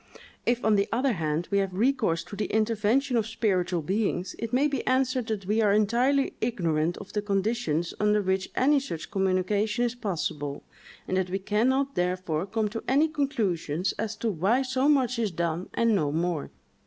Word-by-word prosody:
If, 240 -1 +1
on 215 -2 +4
the 200 - +2
other 255 +3 +2
hand, 160 -1 -2
we 200 - +3
have 195 -2 -2
recourse 215 -7 +1
to 205 - -9
the 210 - -2
intervention 225 +4 +1
of 220 -1 0
spiritual 185 -7 0
beings, 185 0 -1
it 230 -1 -4
may 265 +4 +3
be 275 -4 -2
answered 255 -2 +1
that 210 -4 -3
we 215 +3 +1
are 210 -2 +4
entirely 240 +7 +2
ignorant 170 -8 0
of - - -10
the 210 - 0
conditions 195 -5 -1
under 210 0 +3
which 190 -1 -1
any 285 +3 +4
such 215 - -6
communication 200 +4 +1
is 240 - -1
possible; 155 -10 -3 0.4
and 185 - 0
that 185 -1 0
we 190 - -1
can 210 +5 +1
not 275 +1 0
therefore 180 -1 -1
come 220 +1 0
to 225 +2 -5
any 290 +5 +3
conclusions 195 - -1
as 220 0 -2
to 225 +1 -1
why 200 +9 +2
so 260 +2 +1
much 255 -5 +2
is 220 -3 +1
done, 170 0 -2
and 230 -1 +3
no 150 -7 +1
more. 165 -1 -1
210 Hz, 190 wpm, -27 LUFS, 180-240 Hz, 0.4 s, on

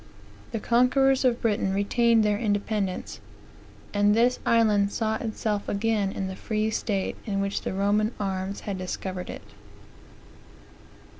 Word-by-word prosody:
The 225 - -2
conquerors 260 +4 +3
of 245 -2 +1
Britain 205 -4 +1
retained 225 +2 +3
their 210 -1 +1
independence; 205 -3 -2 0.7
and 205 0 +3
this 245 +2 +3
island 210 -3 +3
saw 220 0 -1
itself 215 -2 -3
again 205 -1 0
in 195 - -3
that 190 0 -7
free 215 0 -1
state 200 -3 -1
in 195 -2 -1
which 200 0 -1
the - - -3
Roman 205 +3 +2
arms 195 -1 -3
had 195 -3 -4
discovered 185 0 -5
it. - - -7
210 Hz, 135 wpm, -26 LUFS, 200-225 Hz, 0.7 s, conquerors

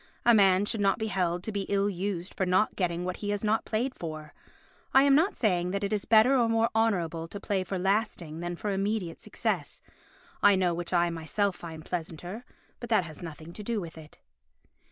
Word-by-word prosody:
A 235 - +7
man 195 -2 +5
should 210 0 -2
not 195 -1 +3
be 220 -1 -2
held 180 -3 0
to 220 - -3
be 200 -2 -3
ill 200 0 +2
used 190 -1 -3
for - - -1
not 185 +3 +2
getting 175 -2 -1
what 180 0 -3
he 205 - -4
has 205 0 -1
not 215 +1 +1
played 245 +4 -1
for. 155 -5 -7 0.6
I 270 - +8
am 280 -1 +5
not 325 +8 +3
saying 180 -6 +1
that 200 +2 -2
it 200 +1 -1
is 210 - -1
better 225 +4 +5
or 235 -3 +3
more 225 +1 +2
honourable 175 -7 0
to 200 - -7
play 195 -2 -1
for 190 +1 -4
lasting 185 -4 -1
than 175 0 -3
for 205 +4 -3
immediate 195 -3 -2
success. - - -2 0.6
I 205 -1 +6
know 180 -2 +2
which 170 0 -5
I 175 -1 +3
myself 170 +5 -1
find 160 -2 -9
pleasanter, 175 +5 -5 0.4
but 240 - -7
that 220 -5 +4
has 155 -3 -10
nothing 165 0 -8
to 210 - -8
do 225 +1 -2
with 170 -4 -7
it. 155 -1 -13
195 Hz, 215 wpm, -28 LUFS, 175-215 Hz, 0.6 s, I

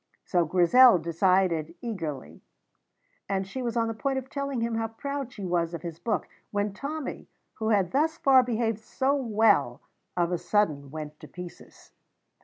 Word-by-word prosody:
So 175 -2 +2
Grizel 185 +8 +6
decided 170 -1 +1
eagerly, 155 - -5 0.9
and 195 -1 0
she 225 +7 -6
was 240 -1 -2
on 230 -1 +2
the 225 - -2
point 270 +4 -2
of 265 0 -5
telling 280 -3 -2
him 230 0 -1
how 225 0 -1
proud 275 +3 -5
she 205 -6 -7
was 170 -1 0
of 170 - -8
his 170 -2 -6
book, 225 - -1 0.2
when 205 -1 -1
Tommy, 285 +5 -5 0.3
who 220 0 0
had 195 -5 +2
thus 315 +4 +1
far 265 -4 +6
behaved 230 -3 -1
so 265 +5 0
well, 225 -5 +2 0.4
of 175 0 +1
a 175 - 0
sudden 170 -6 0
went 150 0 -7
to - - -11
pieces. 180 -1 -11
210 Hz, 170 wpm, -27 LUFS, 175-250 Hz, 0.9 s, Grizel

